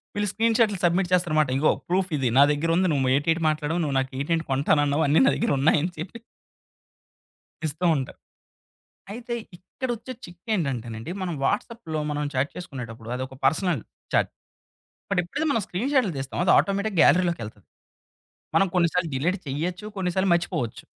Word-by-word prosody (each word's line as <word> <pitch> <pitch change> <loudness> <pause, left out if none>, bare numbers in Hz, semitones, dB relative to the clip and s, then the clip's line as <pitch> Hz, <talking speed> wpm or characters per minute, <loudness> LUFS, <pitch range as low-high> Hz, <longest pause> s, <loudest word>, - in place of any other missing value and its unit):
వీళ్ళు 205 0 0
స్క్రీన్‌షాట్‌లు 225 -2 +2
సబ్మిట్ 175 +1 +2
చేస్తారన్నమాట. 155 -5 +3
ఇదిగో 145 +3 +3 0.2
ప్రూఫ్ 185 +1 +1
ఇది 130 -3 +1
నా 140 - +9
దగ్గరుంది 165 +5 +1
నువ్వు 130 -3 +1
ఏటేటి 165 +4 +1
మాట్లాడావు, 155 +2 -1
నువ్వు 140 -3 -1
నాకు 130 0 -3
ఎటి 165 +4 0
ఏంటి 165 - -3
కొంటానన్నావు 145 +2 +2
అన్ని 150 - +4
నా - - +5
దగ్గర 235 - 0
ఉన్నాయి 150 +2 +4
అని 180 - -1
చెప్పి 195 +8 -7 1.4
ఇస్తూ 155 +4 -2
ఉంటారు. 130 -2 -4 0.9
అయితే 235 +2 -5 0.2
ఇక్కడొచ్చే 240 +5 -5
చిక్కేంటంటే 170 - -3
నండి 110 +9 -6
మనం 175 -3 -2
వాట్సాప్‌లో 205 - -2
మనం 150 0 -2
చాట్ 130 +3 0
చేసుకునేటప్పుడు 120 -9 -8
అదొక 130 +1 -5
పర్సనల్ 160 - +2 0.3
చాట్. - - +3 0.8
బట్ 200 - +1
ఎప్పుడైతే 245 - -3
మనం 225 -6 +1
స్క్రీన్‌షాట్‌లు 245 - +1
తీస్తామో 135 +4 -4
అది 185 - +5
ఆటోమేటిక్‌ 200 0 0
గ్యాలరీలోకెళ్తది. 120 - +2 0.9
మనం 195 - +5
కొన్ని 175 -2 +4
సార్లు 180 -2 +1
డిలీట్ 170 +9 0
చేయొచ్చు 175 +9 -3
కొన్నిసార్లు 190 0 0
మర్చిపోవచ్చు. 145 -9 -2
170 Hz, 150 wpm, -25 LUFS, 140-195 Hz, 1.4 s, నా